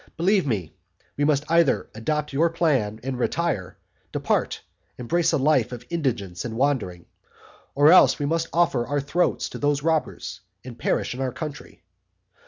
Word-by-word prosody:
Believe 185 0 +2
me, 95 - -2 0.4
we 145 - +1
must 145 -1 +2
either 165 -3 +2
adopt 150 +7 -2
your 165 +5 +3
plan, 135 -11 0
and 130 -1 -4
retire, 125 - -1 0.3
depart, - - -1 0.4
embrace 165 +8 +1
a - - +2
life 135 -4 +2
of 120 -1 -8
indigence 115 - -2
and 115 -1 -5
wandering, 120 -11 -1 0.7
or 145 +3 +6
else 185 - +6
we 145 - -2
must 165 +2 0
offer 165 -8 +2
our 145 +2 0
throats 160 +6 0
to - - -8
those 145 0 0
robbers, 160 -1 -2 0.2
and 125 -2 -10
perish - - 0
in 130 - -6
our 130 -1 -1
country. 150 +1 -8
145 Hz, 160 wpm, -24 LUFS, 120-160 Hz, 0.7 s, or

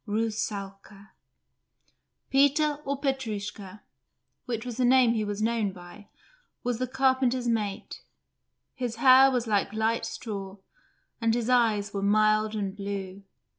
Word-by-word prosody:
RUSSALKA 205 -2 -4 1.2
Peter, 285 +2 +3
or 275 0 -2
Petrushka, 215 -7 -4 0.6
which 230 -1 -4
was 245 -2 -6
the 255 - +1
name 250 -1 +5
he 220 -2 -1
was 205 0 -3
known 225 -3 0
by, 180 +3 -13 0.6
was 245 -1 -2
the 255 - -1
carpenter's 260 -1 +1
mate; 210 -4 -3 0.7
his 245 -3 -4
hair 260 +2 +7
was 250 -3 -1
like 205 -2 0
light 220 +1 0
straw, 200 -3 -6 0.6
and 230 0 +2
his 240 +1 -1
eyes 215 -4 +2
were 200 - -2
mild 215 +1 +2
and 200 -2 -3
blue. 200 -1 -6
220 Hz, 130 wpm, -27 LUFS, 205-250 Hz, 1.2 s, hair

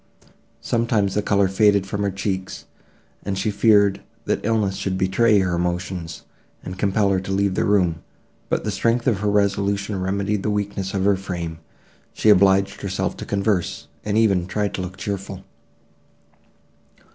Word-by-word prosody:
Several 115 0 0
times 100 -4 +1
the 105 - +1
colour 100 -1 +2
faded 100 0 +3
from 100 +1 -4
her 100 - +1
cheeks, 95 -1 -4 0.6
and 100 -1 -3
she 105 +3 0
feared, 100 -1 +3 0.2
that - - -1
illness 100 -3 0
would 95 -2 -1
betray 105 +4 +3
her 95 -2 +1
emotions, 90 0 -3 0.4
and 90 0 -7
compel 100 0 +2
her 95 - +2
to 95 +1 -6
leave 100 0 +1
the - - 0
room; 90 -5 +2 0.5
but - - 0
the 105 - -2
strength 115 +5 0
of 115 -7 +2
her 105 +1 0
resolution 100 -1 0
remedied 100 +2 -1
the 105 - -1
weakness 100 -2 -2
of 95 -1 0
her 100 -1 +4
frame; 85 -4 -5 0.5
she 110 - +2
obliged 100 0 +3
herself 95 -2 -2
to - - -7
converse, 100 -3 -1
and 105 0 -1
even 100 -6 +2
tried 105 +1 -2
to - - -3
look 90 +1 -6
cheerful. 95 0 -5
100 Hz, 165 wpm, -22 LUFS, 95-105 Hz, 0.6 s, her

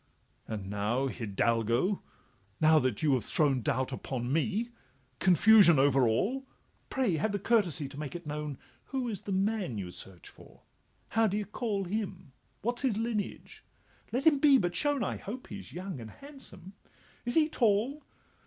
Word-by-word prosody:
'And 105 -3 -5
now, 105 +7 0
Hidalgo! 115 - 0 0.6
now 155 0 +6
that 130 -4 -1
you 150 -3 +4
have 125 -4 +1
thrown 135 +1 +2
Doubt 130 0 -1
upon 130 0 -3
me, 215 +9 0 0.5
confusion 185 -1 +6
over 135 -2 +4
all, 245 - 0 0.4
Pray 240 -11 +1
have 205 +7 0
the - - +1
courtesy 185 -9 +1
to 140 +1 -10
make 150 +1 -5
it 175 -1 -7
known 150 -2 -4 0.3
Who 260 -2 -3
is 210 -5 -4
the 200 - -6
man 195 - 0
you 90 -3 -5
search 90 0 -8
for? - - -17 0.5
how 225 +1 +3
d' 200 - -1
ye 210 - 0
cal 210 -2 -2
Him? 190 -5 -4 0.3
what 240 +3 -1
's - - -5
his 250 -6 +1
lineage? 225 -2 -4 0.5
let 255 +5 -1
him 300 -3 +5
but 270 - +5
be - - -12
shown— 290 -3 +1
I - - -2
hope 245 +6 -8
he 200 - -6
's - - -12
young 185 -4 -6
and 115 -2 -8
handsome—is 245 - -10
he 315 -2 +5
tall? 245 +2 +1
185 Hz, 170 wpm, -30 LUFS, 135-225 Hz, 0.6 s, now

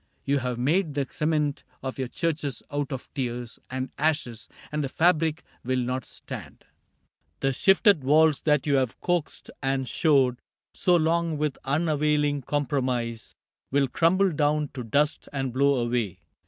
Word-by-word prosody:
You 140 0 +2
have 125 -1 -3
made 150 +5 +1
The 140 -1 0
cement 150 -2 0 0.2
of 130 0 -5
your 130 - -1
churches 150 -3 -2
out 145 -1 -2
of 130 -2 -5
tears 120 -3 -4
And 130 +1 -4
ashes, 145 -8 -1 0.2
and 150 0 -1
the 135 - -2
fabric 160 0 +2 0.2
will 130 +1 0
not 125 0 -2
stand: - - -9 0.8
The 135 0 +1
shifted 195 - +4
walls 155 +2 +4
that 150 -3 +2
you 140 -2 +3
have 130 -3 -1
coaxed 175 -3 -2
and 135 -1 0
shored 135 -6 +3 0.3
So 180 - +3
long 165 -1 +1
with 150 -2 -2
unavailing 150 -1 +1
compromise 130 -5 -2 0.3
Will 140 0 +2
crumble 185 +7 +3
down 150 -1 +1
to 130 -3 -6
dust 145 +7 0
and 135 -3 -2
blow 140 +2 +3
away. 120 -5 -1
145 Hz, 150 wpm, -26 LUFS, 130-155 Hz, 0.8 s, shifted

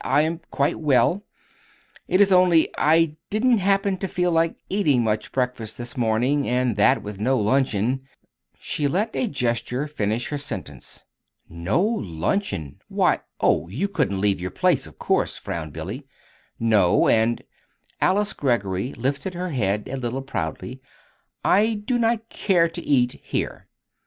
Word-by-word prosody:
"I 150 - +3
am 165 +2 -2
quite 140 0 0
well. 160 - +2 0.8
It 185 - +3
is 200 -1 +5
only 180 -3 +5
I 160 0 +3
didn't 230 +2 +2
happen 195 0 +1
to 190 - -3
feel 180 0 0
like 165 0 +2
eating 150 - +2
much 110 -1 -1
breakfast 125 -4 -2
this 120 +3 -7
morning; 125 +4 +1
and 125 -2 +1
that, 105 - +3
with 105 -1 -7
no 130 +5 +2
luncheon 125 +1 +1 0.3
" - - -62 0.3
She 145 - -1
let 200 +9 -1
a 255 - 0
gesture 125 - -1
finish 115 -5 -2
her 145 - -3
sentence. 80 - -8 0.4
"No 85 - -1
luncheon! 95 - -2
Why - - +2 0.2
oh, 80 - +2
you 125 - -2
couldn't 100 - -1
leave 100 -3 +1
your 90 - -3
place, - - +1
of - - -16
course," - - 0
frowned 80 -3 -5
Billy. 95 - -7 0.5
"No, 105 -6 +3
and" 115 +1 +2 0.6
Alice 205 +2 +2
Greggory 115 -4 -1
lifted 140 +8 -2
her 180 +1 -3
head 105 - -1
a 135 - -4
little 130 +1 -3
proudly 130 +2 -5 0.6
"I 215 +3 +4
do 245 +1 +1
not 225 -1 +1
care 180 -7 +2
to 170 +1 -7
eat 125 -6 +1
here." - - -4
135 Hz, 150 wpm, -23 LUFS, 110-180 Hz, 0.8 s, is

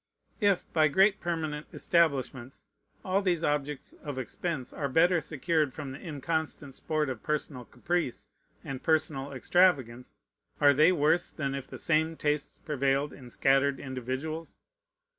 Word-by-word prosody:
If 200 -5 +3
by 155 -2 +5
great 195 +7 +4
permanent 155 -3 -3
establishments 135 -6 0 0.4
all 190 +1 +2
these 175 -4 0
objects 145 -1 -2
of 145 -3 -5
expense 130 +2 -3
are 140 -2 -2
better 170 +4 +4
secured 155 -1 0
from 145 -3 -6
the 135 - -8
inconstant 155 -2 -3
sport 155 +2 -1
of 130 -4 -4
personal 145 -4 -2
caprice 175 -8 -2 0.4
and 135 -2 -6
personal 150 -3 +1
extravagance, 130 -4 +2 0.4
are 145 -1 +6
they 155 +6 +5
worse 160 +1 +2
than 140 -3 -3
if 135 -1 -5
the - - -8
same 160 0 +1
tastes 150 -1 -1
prevailed 140 -1 0
in 125 -3 -12
scattered 135 +2 +2
individuals? 130 +5 -5
150 Hz, 140 wpm, -29 LUFS, 135-165 Hz, 0.4 s, are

